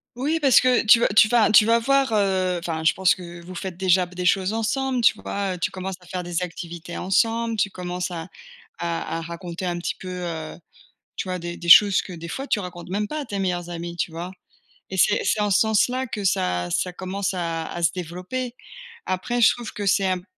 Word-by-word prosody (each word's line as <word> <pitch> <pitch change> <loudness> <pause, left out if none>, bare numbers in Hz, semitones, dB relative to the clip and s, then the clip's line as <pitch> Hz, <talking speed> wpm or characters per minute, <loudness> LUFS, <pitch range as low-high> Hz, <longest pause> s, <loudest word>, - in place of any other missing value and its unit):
Oui 295 +6 -1
parce 275 -5 +5
que 255 -1 +3
tu 225 +1 +7
vas - - +3
tu 210 +1 +6
vas 230 -3 +4
tu 215 0 +7
vas 230 +1 +4
voir, 275 +2 +2
heu, 190 -3 +1
enfin 165 -2 -4
je 160 - +4
pense 190 -1 +3
que, 185 - -11
heu, 175 0 -9
vous 180 +2 -10
faites 180 -1 -6
déjà 185 -1 +3
b 180 - -16
des 180 - -3
choses 190 +2 +2
ensemble, 250 +3 -1
tu 230 - +5
vois? 200 -2 -3
Heu, - - -6
tu 195 - 0
commences 190 -1 -5
à 180 - -18
faire 180 0 -4
des 175 0 -2
activités 170 -1 -6
ensemble, 225 +4 +1
tu 200 - +1
commences 180 -1 -4
à 165 -1 -6 0.5
à 170 -1 -3
à 165 - -4
raconter 170 +2 -6
un 175 -1 -2
petit 170 - -3
peu, 185 - -10
heu, 170 -3 -5 0.6
tu 185 - -4
vois, 185 - -2
des 175 0 -6
des 170 - -7
choses 200 +2 +8
que, 185 - -9
des 170 0 -8
fois, 270 +11 -5
tu 215 - 0
racontes 175 -2 -8
même 205 +3 -2
pas 305 - -4
à 290 - -4
tes 205 -3 -4
meilleurs 175 -2 -2
amis, 170 0 -6
tu 175 - -2
vois? 170 +3 -6 0.6
Et 190 - -4
c'est 205 - +3
c'est 215 - +1
en 210 - +1
ce 195 - +4
sens-là 235 +5 +2
que 210 -3 -5
ça 90 - 0
ça 180 - -1
commence 190 +2 -3
à 165 -2 -2
à 175 - -6
se 165 - +4
développer. 185 +9 -5 0.5
Après, 240 +6 -1
je - - +6
trouve 240 -2 -7
que 205 - -5
c'est 195 0 +3
imp 185 -1 -1
185 Hz, 240 wpm, -23 LUFS, 175-215 Hz, 0.6 s, choses